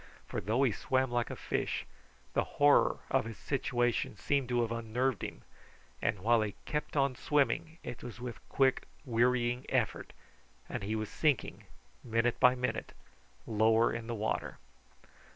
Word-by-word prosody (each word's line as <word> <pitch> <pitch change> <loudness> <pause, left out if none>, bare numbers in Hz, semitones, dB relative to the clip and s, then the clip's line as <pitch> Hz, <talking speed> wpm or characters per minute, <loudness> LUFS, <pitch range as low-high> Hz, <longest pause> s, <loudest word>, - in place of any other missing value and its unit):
For - - -4
though 115 +8 +1
he 130 - +4
swam 130 +4 0
like 120 -1 0
a - - -4
fish, - - -2 0.5
the - - +2
horror 145 0 +5
of - - +2
his 115 -2 -7
situation 120 -5 0
seemed 140 0 0
to 120 -1 +2
have 115 - -3
unnerved 115 +1 -1
him, - - -6 0.6
and 100 - 0
while 115 +2 +4
he 105 -2 -2
kept 150 0 -3
on 140 -1 +3
swimming, 150 +4 0
it 120 - -7
was 120 -1 -8
with 120 -4 -6
quick 135 -1 +2 0.2
wearying 125 0 +2
effort, - - 0 0.6
and - - -4
he 105 +3 -2
was 110 -1 -2
sinking 150 -4 0 0.4
minute 115 +1 +1
by 125 0 +6
minute 125 0 -3 0.5
lower 110 +1 +3
in 115 -1 -5
the 120 - -3
water. 110 0 -2
120 Hz, 155 wpm, -32 LUFS, 115-130 Hz, 0.6 s, by